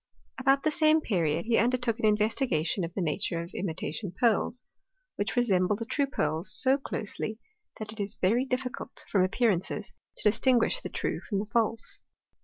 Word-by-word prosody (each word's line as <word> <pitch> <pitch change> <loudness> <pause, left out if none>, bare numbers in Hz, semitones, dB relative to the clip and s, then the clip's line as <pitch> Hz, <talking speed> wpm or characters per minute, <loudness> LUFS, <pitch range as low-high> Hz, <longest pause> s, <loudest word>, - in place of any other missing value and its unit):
About 270 +1 +3
the 310 - +2
same 310 0 +4
period, 170 - 0
he 230 0 +3
undertook 240 0 +1
an 220 - +3
investigation 210 - +1
of 165 - -3
the 190 - 0
nature 165 +1 -1
of 170 - -10
imitation 180 +1 -3
pearls, 240 +1 +2 0.5
which 205 +3 -2
resemble 200 -5 +3
the 230 +2 -5
true 280 +4 0
pearls 180 - -1
so 265 +1 +3
closely, 220 -3 -4 0.4
that 215 0 -6
it 220 - -11
is 200 0 -2
very 225 +7 +2
difficult, 255 -1 -4
from 195 -3 +4
ap 185 - -1
pearances, 210 -2 0 0.3
to - - +1
distinguish 255 - +3
the - - -5
true - - -2
from 205 - 0
'the 205 +2 -3
false. 230 -1 0
220 Hz, 175 wpm, -29 LUFS, 190-250 Hz, 0.5 s, same